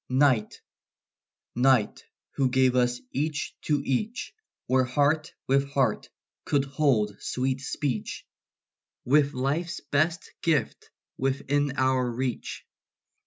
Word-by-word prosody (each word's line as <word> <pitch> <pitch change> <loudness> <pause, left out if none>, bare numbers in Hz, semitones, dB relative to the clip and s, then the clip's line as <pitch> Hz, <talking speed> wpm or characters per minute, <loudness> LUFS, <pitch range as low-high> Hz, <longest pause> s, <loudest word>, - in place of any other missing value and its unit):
night, 130 -5 +2 1.7
who 135 -2 +1
gave 130 0 +3
us 125 -1 +2
each 150 +2 -2
to 145 -2 0
each, 220 - -2 0.3
Where 130 0 +3
heart 145 +5 +1 0.2
with 140 +1 +2
heart 130 -6 +1 0.3
could 140 -2 +1
hold 135 -7 +1
sweet 130 +1 -1
speech, 135 -5 -3 0.8
With 145 +2 +3
life's 150 +7 -1
best 155 +4 -1
gift 155 -8 0 0.3
within 140 +1 0
our 130 -1 +2
reach. 125 +1 -4
135 Hz, 100 wpm, -27 LUFS, 130-145 Hz, 1.7 s, gave